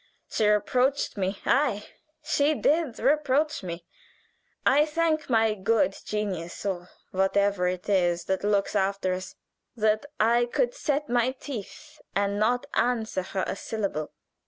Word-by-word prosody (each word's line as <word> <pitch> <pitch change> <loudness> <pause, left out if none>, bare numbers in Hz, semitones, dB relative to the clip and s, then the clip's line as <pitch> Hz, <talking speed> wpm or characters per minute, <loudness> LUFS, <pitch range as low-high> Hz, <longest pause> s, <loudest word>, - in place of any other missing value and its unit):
She 215 - +2
reproached 250 +7 +2
me 195 0 -1
ay, 240 -7 +2 0.4
she 300 0 +2
did 300 -4 +1
reproach 300 +1 +2
me. 170 -2 -6 0.8
I 285 +3 +5
thank 310 -1 0
my 225 -2 +3
good 205 0 +1
genius, 195 -5 -3
or 180 -2 -3 0.2
whatever 195 0 +2
it 180 0 -3
is 175 -4 +2
that 190 0 -1
looks 205 0 +1
after 195 -1 +1
us, 185 0 -6 0.4
that 215 +3 +1
I 235 +2 +4
could - - 0
set 295 - -1
my 245 0 +1
teeth 280 +4 -9
and 200 0 0
not 245 +5 +2
answer 230 -5 0
her 190 0 -3
a - - -3
syllable." 200 -8 -3
215 Hz, 135 wpm, -27 LUFS, 195-270 Hz, 0.8 s, I